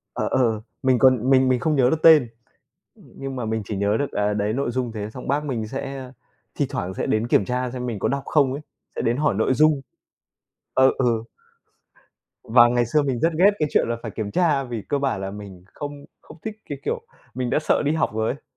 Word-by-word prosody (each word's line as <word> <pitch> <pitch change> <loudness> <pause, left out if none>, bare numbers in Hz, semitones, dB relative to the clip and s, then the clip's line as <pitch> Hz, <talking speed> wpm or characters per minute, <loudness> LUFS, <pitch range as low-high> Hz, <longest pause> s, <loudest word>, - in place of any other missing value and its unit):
Ờ, - - -1
ờ, 115 -4 +1 0.2
mình 130 -2 +3
còn 130 -1 +4
mình 130 -1 +5
mình 125 -1 +2
không 155 -2 +1
nhớ 125 -2 +4
được 160 - -1
tên, 155 -7 +7 0.7
nhưng 135 -1 -9
mà 120 -3 -3
mình 110 0 -1
chỉ 105 - -4
nhớ 100 +2 +1
được, 145 - -2
à, 105 0 0
đấy 105 +1 -1
nội 135 -2 -1
dung 125 -2 -2
thế 105 -1 -5
xong 125 +3 -9
bác 145 +2 0
mình 115 -6 -3
sẽ 135 0 -6 0.4
thi - - +1
thoảng 95 +2 -4
sẽ - - -3
đến 110 +2 0
kiểm 100 - +3
tra 125 0 -2
xem 125 -1 -5
mình 115 -5 -4
có - - 0
đọc 140 0 -2
không 140 -4 +2
ấy, 145 - -5 0.3
sẽ - - -2
đến 120 +3 0
hỏi 150 -7 +2
nội 110 +5 +2
dung. 150 0 +3 0.9
Ờ, 130 0 +5
ừ. 115 -3 +1 1.2
Và 120 +1 +6
ngày 120 0 +1
xưa 150 +6 +2
mình 130 -4 -1
rất 165 0 +1
ghét 195 +4 +6
cái 150 -1 0
chuyện - - +2
là 115 - -1
phải - - -5
kiểm 105 -2 -4
tra 150 - +2
vì 120 -4 -5
cơ 145 - +1
bản 135 -8 -1
là 95 0 -4
mình 100 -3 -10
không 145 -1 -7 0.2
không - - -14
thích 215 -1 -4
cái 145 - -4
kiểu 480 - -1 0.3
mình 125 -1 -2
đã - - +2
sợ - - +1
đi 145 - +2
học 160 - +1
rồi 110 0 0
ấy. 140 - -19
125 Hz, 235 wpm, -23 LUFS, 110-140 Hz, 1.2 s, tên